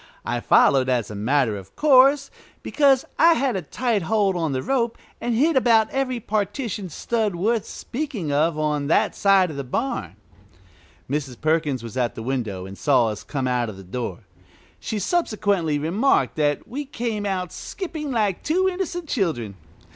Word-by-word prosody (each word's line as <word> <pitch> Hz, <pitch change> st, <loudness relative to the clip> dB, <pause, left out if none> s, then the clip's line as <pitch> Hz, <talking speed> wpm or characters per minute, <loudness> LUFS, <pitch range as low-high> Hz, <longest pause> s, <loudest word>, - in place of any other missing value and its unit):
I -, -, -1 dB
followed, 130 Hz, -2 st, +4 dB
as 120 Hz, -4 st, 0 dB
a -, -, -6 dB
matter 120 Hz, +2 st, +1 dB
of 95 Hz, -1 st, -11 dB
course, 275 Hz, -1 st, +5 dB, 0.3 s
because 275 Hz, -3 st, +3 dB
I 335 Hz, +1 st, +7 dB
had 265 Hz, -5 st, 0 dB
a 190 Hz, -, -1 dB
tight 225 Hz, -, -1 dB
hold 200 Hz, +2 st, +1 dB
on 165 Hz, -4 st, -1 dB
the 130 Hz, -1 st, -2 dB
rope, 235 Hz, -4 st, 0 dB, 0.2 s
and 240 Hz, -1 st, -1 dB
hit 310 Hz, +8 st, +3 dB
about 230 Hz, -4 st, +4 dB
every 255 Hz, -2 st, -1 dB
partition 210 Hz, -1 st, -3 dB
stud 215 Hz, +3 st, -1 dB
worth 215 Hz, +4 st, 0 dB
speaking 240 Hz, -, -4 dB
of 155 Hz, +2 st, +2 dB
on 150 Hz, -2 st, -1 dB
that 160 Hz, -, +2 dB
side 195 Hz, -3 st, +4 dB
of 145 Hz, -, -8 dB
the 140 Hz, -, -3 dB
barn. 130 Hz, -, -3 dB, 0.9 s
Mrs. 135 Hz, -3 st, -3 dB
Perkins 155 Hz, -5 st, 0 dB
was 115 Hz, +2 st, -7 dB
at 120 Hz, -2 st, 0 dB
the 115 Hz, -, -6 dB
window 110 Hz, -8 st, -3 dB
and 95 Hz, +1 st, -10 dB
saw 130 Hz, -6 st, +3 dB
us 105 Hz, -1 st, -5 dB
come 135 Hz, -3 st, -3 dB
out 125 Hz, -2 st, 0 dB
of 100 Hz, -, -9 dB
the 95 Hz, -, -10 dB
door. 115 Hz, +5 st, -5 dB, 0.6 s
She 220 Hz, -, -4 dB
subsequently 205 Hz, -, 0 dB
remarked 185 Hz, -, +1 dB
that 145 Hz, -2 st, 0 dB
we 280 Hz, +5 st, -4 dB
came 230 Hz, -6 st, -3 dB
out 185 Hz, -3 st, -2 dB
skipping 320 Hz, -6 st, -6 dB
like 215 Hz, -7 st, 0 dB
two 370 Hz, +5 st, +1 dB
innocent 360 Hz, -2 st, -3 dB
children. 160 Hz, -, -1 dB
190 Hz, 170 wpm, -23 LUFS, -, 0.9 s, I